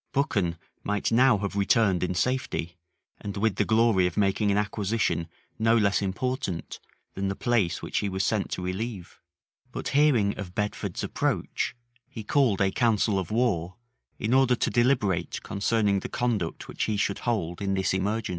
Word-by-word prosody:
[*] - - -46
Buchan 100 - 0 0.3
might 105 +2 -1
now 125 0 +5
have 100 0 -4
returned 100 -2 +3
in 90 0 -1
safety, 110 -7 -1 0.4
and 100 0 -6
with 105 0 +1
the 105 - +2
glory 110 -4 +3
of 90 - -6
making 105 +1 +2
an 100 - +2
acquisition 105 -3 0 0.3
no 115 +1 +4
less 100 -3 +2
important 100 -2 -3 0.3
than 95 0 -2
the 95 - -2
place 110 -9 0
which - - -1
he 100 - -1
was 95 +1 -1
sent 110 -3 0
to 90 - -4
relieve: 95 +1 -5 0.5
but - - -4
hearing 135 -9 +3
of 95 -2 -7
Bedford's 105 -1 -3
approach, - - -1 0.3
he 110 - -7
called 115 -4 +2
a 95 -1 +3
council 110 -4 +2
of 90 - -4
war, 100 -7 0 0.4
in 110 +3 -1
order 130 -1 +4
to - - -1
deliberate 105 -9 +1
concerning 100 0 +1
the - - -6
conduct 110 -9 -2
which - - -2
he 105 - -1
should 100 0 0
hold 95 -8 -2
in 100 -1 0
this 95 -1 0
emergence. 105 +4 -1
105 Hz, 175 wpm, -27 LUFS, 95-115 Hz, 0.5 s, now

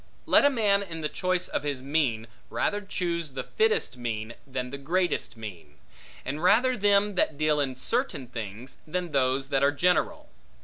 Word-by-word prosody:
Let - - +5
a - - +7
man, 210 -6 +2
in 165 -5 -6
the 150 - -1
choice 185 +1 0
of - - -2
his 140 -3 -3
mean, 135 -6 0 0.2
rather 205 0 0
choose 170 -6 -3
the 130 -1 -4
fittest 445 - +1
mean, 115 -2 -4
than 130 -1 -4
the 140 - -6
greatest 170 -3 -1
mean; 90 -9 -9 0.5
and 145 +4 -3
rather 240 +8 +4
them 205 -1 +3
that 155 -5 +1
deal 155 0 +2
in 135 -3 0
certain 230 - -1
things, 115 +1 -7
than 175 +1 -3
those 135 0 +1
that 135 -1 +2
are 140 +1 +4
general. 180 +5 +1
150 Hz, 175 wpm, -27 LUFS, 130-185 Hz, 0.5 s, a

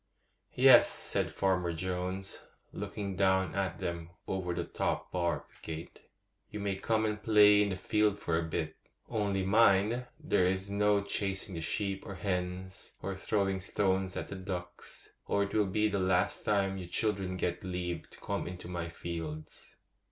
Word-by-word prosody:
* - - -46
'Yes,' - - +8
said - - -1
Farmer 90 -3 +1
Jones, 90 +2 -3 0.3
looking 100 -2 -4
down 95 0 +2
at 95 -3 -1
them 85 -1 -4 0.2
over 95 -2 -2
the 85 0 -1
top - - -2
bar 85 -5 0
of - - -24
the 80 - -4
gate, 80 - -10 0.5
'you 105 - -6
may 100 -1 -1
come 110 +3 +1
and 105 0 -2
play 105 -1 +7
in 105 - +2
the 95 - -1
field 105 +2 +1
for 85 -5 -1
a 80 - +2
bit; 80 -1 -3 0.3
only 100 -3 0
mind, 110 +3 +4
there 90 - +2
is 95 +1 0
to 100 - -6
be 100 - -2
no 105 -1 +4
chasing 95 -1 -2
the 85 - -4
sheep 95 +3 -1
or 100 - -7
hens, 90 0 -3
or 100 - -2
throwing 95 0 0
stones 95 -1 0
at - - -3
the - - -5
ducks, 90 -2 -7 0.2
or 100 - +2
it 100 - -5
will 105 -2 +3
be 105 +3 +2
the 100 -1 -1
last 95 0 +1
time 100 -3 +1
you 90 - -6
children 95 -1 -1
get 90 0 -2
leave 90 -2 -4
to - - -16
come - - -2
into 90 0 -7
my 85 -2 -4
fields. 80 -2 -7
95 Hz, 180 wpm, -32 LUFS, 90-100 Hz, 0.5 s, Yes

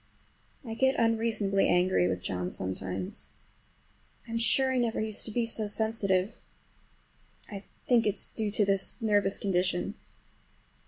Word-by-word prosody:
I 225 - -5
get 265 +3 +2
unreasonably 225 -4 +1
angry 180 - +3
with 90 -1 -3
John 90 -1 -3
sometimes. 95 0 -4 0.9
I'm 230 0 -3
sure 260 +3 +4
I 255 - +1
never 235 -2 0
used 215 -1 0
to - - -6
be 235 +2 0
so 225 -2 -1
sensitive. 205 -2 0 1.1
I 200 -1 -8 0.2
think 235 -3 +3
it 205 - +1
is - - -3
due 220 -2 -2
to 205 0 +1
this 195 +3 0
nervous 205 -3 +1
condition. 180 -1 0
210 Hz, 140 wpm, -29 LUFS, 185-225 Hz, 1.1 s, sure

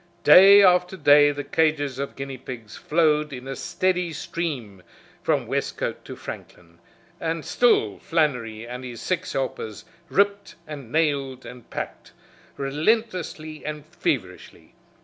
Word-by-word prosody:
Day 200 +2 +9
after 180 0 +4
day 145 -2 +6
the 145 0 -5
cages 145 -3 0
of 140 - -4
guineapigs 130 -5 -8
flowed 150 -2 +1
in 130 -1 -8
a 135 - -4
steady 180 +1 -1
stream 135 - -5 0.4
from - - 0
Westcote - - -3
to - - -8
Franklin, 85 -1 -10 0.4
and 165 -1 -3
still 110 - +2
Flannery 125 -9 -1
and 125 +2 -7
his 120 -2 -7
six 180 -1 -2
helpers 115 -5 -4 0.2
ripped 200 +1 +1
and 140 -6 -9
nailed 140 -5 0
and 125 -1 -11
packed - - -7 0.4
relentlessly 155 +1 -1
and 150 -1 -6
feverishly. - - -4
150 Hz, 125 wpm, -24 LUFS, 130-170 Hz, 0.4 s, Day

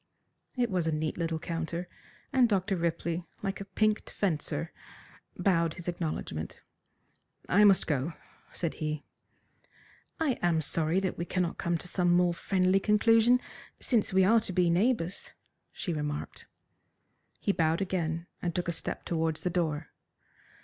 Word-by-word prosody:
It 240 -3 0
was 180 -3 0
a - - +2
neat 155 +2 -2
little 165 -1 0
counter, 170 +1 -4 0.5
and 255 -3 +5
Dr. 195 -1 +1
Ripley, 170 0 -1 0.2
like 195 0 -2
a - - -5
pinked 215 +2 0
fencer, 160 -3 -2 0.7
bowed 170 -5 +2
his 175 -1 -9
acknowledgment. 155 - -3 0.9
"I 205 +4 +5
must 195 -2 +5
go," 150 +2 -1 0.4
said 170 -3 -2
he. 155 -1 -2 1.2
"I 300 -6 +1
am 175 -2 +3
sorry 160 +3 +1
that 190 -3 -2
we 170 - -1
cannot 180 -1 -1
come 170 0 0
to 170 - -7
some 180 0 +1
more 175 0 +4
friendly 185 +2 +2
conclusion 225 +4 +5 0.4
since 230 -5 +1
we 190 0 +5
are 225 +5 +6
to 215 - -3
be 175 -1 +3
neighbours," 195 -1 0 0.4
she 175 - -3
remarked. 150 -1 -4 0.9
He 200 - +1
bowed 165 -3 +1
again, 170 -4 -1 0.2
and 175 -2 -2
took 180 - -1
a - - +1
step 165 - -5
towards 160 -2 -1
the 180 - -1
door. 160 -4 -1
175 Hz, 150 wpm, -30 LUFS, 165-195 Hz, 1.2 s, are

